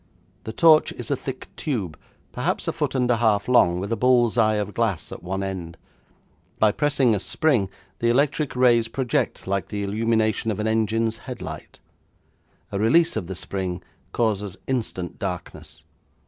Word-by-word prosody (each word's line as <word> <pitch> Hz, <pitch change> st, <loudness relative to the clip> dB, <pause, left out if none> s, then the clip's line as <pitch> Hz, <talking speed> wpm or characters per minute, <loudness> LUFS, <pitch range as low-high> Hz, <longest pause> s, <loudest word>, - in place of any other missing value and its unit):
The 110 Hz, -, -4 dB
torch 155 Hz, +4 st, +5 dB
is 120 Hz, 0 st, -6 dB
a -, -, +3 dB
thick 130 Hz, 0 st, -7 dB
tube, 105 Hz, -, -3 dB, 0.4 s
perhaps -, -, -2 dB
a -, -, 0 dB
foot -, -, -2 dB
and 125 Hz, -1 st, +2 dB
a 120 Hz, -, +3 dB
half 110 Hz, -3 st, +2 dB
long, 90 Hz, -8 st, +4 dB
with 100 Hz, +4 st, -4 dB
a -, -, +2 dB
bull's 120 Hz, -2 st, +3 dB
eye 110 Hz, -2 st, +3 dB
of 105 Hz, -1 st, -2 dB
glass 110 Hz, -8 st, -1 dB
at -, -, -8 dB
one 95 Hz, +3 st, -3 dB
end. 90 Hz, -4 st, -5 dB, 0.8 s
By 110 Hz, -1 st, +4 dB
pressing 140 Hz, -2 st, +2 dB
a 105 Hz, -, 0 dB
spring 120 Hz, -3 st, +1 dB, 0.3 s
the 115 Hz, -, +2 dB
electric 140 Hz, +3 st, +1 dB
rays 120 Hz, -2 st, +4 dB
project 125 Hz, +1 st, -1 dB
like 100 Hz, 0 st, -1 dB
the 105 Hz, -1 st, -4 dB
illumination 110 Hz, +2 st, 0 dB
of 105 Hz, -, -2 dB
an 105 Hz, -, -1 dB
engine's 110 Hz, 0 st, 0 dB
headlight. -, -, -8 dB, 0.9 s
A 100 Hz, -, -2 dB
release 160 Hz, +11 st, +4 dB
of 85 Hz, -, -3 dB
the 95 Hz, -, -5 dB
spring 90 Hz, -1 st, -4 dB, 0.3 s
causes 105 Hz, -4 st, -1 dB
instant 110 Hz, -9 st, -3 dB
darkness. 90 Hz, -3 st, -6 dB
110 Hz, 165 wpm, -24 LUFS, 100-125 Hz, 0.9 s, torch